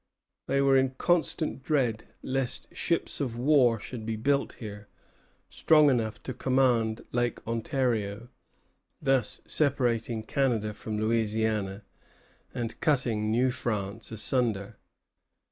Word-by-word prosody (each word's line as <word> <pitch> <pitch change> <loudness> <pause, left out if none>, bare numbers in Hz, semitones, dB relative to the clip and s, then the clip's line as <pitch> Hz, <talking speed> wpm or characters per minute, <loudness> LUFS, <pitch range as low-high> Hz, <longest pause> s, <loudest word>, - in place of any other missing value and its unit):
They 140 0 +2
were 135 -1 +5
in 130 0 +1
constant 165 -3 0
dread 130 -6 0 0.2
lest 130 -1 -3
ships 170 -2 -1
of 120 -4 -2
war 125 -3 +4
should 115 +2 -7
be 110 0 -2
built 140 +5 +1
here, 105 -2 -9 0.6
strong 150 -2 +4
enough 115 -3 -1
to 130 - -4
command 120 -3 +1
Lake 120 -1 -1
Ontario, 115 -2 -1 0.7
thus 135 -5 0
separating 120 -6 0
Canada 110 -4 0
from 110 0 -5
Louisiana, 110 -2 0 0.7
and 120 -2 -5
cutting 120 -9 +1
New 125 +4 +2
France 110 -2 -3
asunder. 110 -2 -1
120 Hz, 110 wpm, -28 LUFS, 110-135 Hz, 0.7 s, were